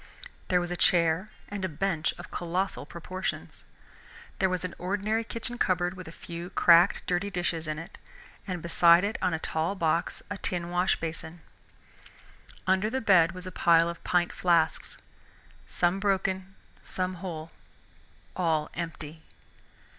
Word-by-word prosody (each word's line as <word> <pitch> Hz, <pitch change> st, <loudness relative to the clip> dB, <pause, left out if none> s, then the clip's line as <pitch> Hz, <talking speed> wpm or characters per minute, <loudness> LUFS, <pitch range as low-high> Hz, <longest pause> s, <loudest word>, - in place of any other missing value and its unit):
There 180 Hz, -2 st, +3 dB
was 175 Hz, 0 st, -3 dB
a -, -, -1 dB
chair 170 Hz, +2 st, +2 dB, 0.2 s
and 205 Hz, -2 st, -5 dB
a 190 Hz, -, 0 dB
bench 165 Hz, 0 st, 0 dB
of -, -, -10 dB
colossal 180 Hz, +3 st, -2 dB
proportions. 185 Hz, +2 st, -5 dB, 0.8 s
There 190 Hz, -, +3 dB
was 185 Hz, -1 st, -2 dB
an 180 Hz, -, -5 dB
ordinary 205 Hz, +4 st, 0 dB
kitchen 235 Hz, +2 st, -6 dB
cupboard 180 Hz, -1 st, +1 dB
with 185 Hz, -2 st, -9 dB
a -, -, -8 dB
few 170 Hz, +1 st, -8 dB
cracked 175 Hz, +2 st, +5 dB
dirty 180 Hz, +3 st, 0 dB
dishes 175 Hz, -4 st, -2 dB
in 155 Hz, 0 st, -2 dB
it, 165 Hz, +5 st, -9 dB, 0.5 s
and 180 Hz, -3 st, -4 dB
beside 170 Hz, +1 st, +6 dB
it 205 Hz, +3 st, -1 dB
on 180 Hz, -3 st, +1 dB
a -, -, -1 dB
tall 160 Hz, +4 st, -2 dB
box 165 Hz, -2 st, 0 dB
a 205 Hz, -, -4 dB
tin 175 Hz, -1 st, -1 dB
washbasin. 165 Hz, -2 st, -1 dB, 1.2 s
Under 190 Hz, +3 st, +2 dB
the 265 Hz, -, -1 dB
bed 180 Hz, -7 st, +5 dB
was 185 Hz, 0 st, -8 dB
a 185 Hz, -, -6 dB
pile 165 Hz, -1 st, +4 dB
of 170 Hz, -, -8 dB
pint 175 Hz, -1 st, +1 dB
flasks, 170 Hz, -3 st, +1 dB, 0.7 s
some 175 Hz, +2 st, +1 dB
broken, 195 Hz, -1 st, -1 dB, 0.3 s
some 185 Hz, 0 st, -2 dB
whole, 165 Hz, -4 st, -6 dB, 0.8 s
all 160 Hz, -4 st, 0 dB
empty. 160 Hz, -2 st, -6 dB
180 Hz, 145 wpm, -28 LUFS, 165-190 Hz, 1.2 s, beside